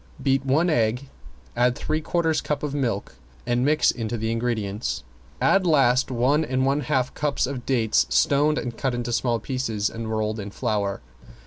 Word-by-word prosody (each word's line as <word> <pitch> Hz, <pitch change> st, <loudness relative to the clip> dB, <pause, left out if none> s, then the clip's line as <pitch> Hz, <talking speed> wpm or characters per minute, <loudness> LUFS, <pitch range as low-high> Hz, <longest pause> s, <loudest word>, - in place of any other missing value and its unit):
Beat 135 Hz, 0 st, +1 dB
one 140 Hz, +6 st, +2 dB
egg, 125 Hz, +1 st, 0 dB, 0.5 s
add 125 Hz, +1 st, +2 dB
three 155 Hz, +1 st, -2 dB
quarters 160 Hz, -1 st, 0 dB
cup 150 Hz, -1 st, -3 dB
of 145 Hz, -2 st, -2 dB
milk 115 Hz, -, -2 dB, 0.3 s
and 120 Hz, 0 st, +1 dB
mix 150 Hz, +2 st, +3 dB
into 115 Hz, -1 st, -4 dB
the 110 Hz, +1 st, -2 dB
ingredients. 115 Hz, -3 st, -2 dB, 0.4 s
Add 195 Hz, -2 st, +3 dB
last 135 Hz, -5 st, +3 dB
one 130 Hz, +5 st, +2 dB
and 130 Hz, -3 st, 0 dB
one 140 Hz, +2 st, +2 dB
half 135 Hz, -4 st, 0 dB
cups 150 Hz, -1 st, 0 dB
of 130 Hz, -2 st, -6 dB
dates 115 Hz, -, +2 dB
stoned 145 Hz, -, +3 dB
and 120 Hz, -2 st, -3 dB
cut 130 Hz, +1 st, -1 dB
into 120 Hz, 0 st, -3 dB
small 120 Hz, 0 st, +1 dB
pieces 115 Hz, -6 st, -2 dB
and 115 Hz, -1 st, -5 dB
rolled 110 Hz, 0 st, -1 dB
in 100 Hz, 0 st, -5 dB
flour. 100 Hz, -1 st, -2 dB
125 Hz, 175 wpm, -24 LUFS, 115-140 Hz, 0.5 s, mix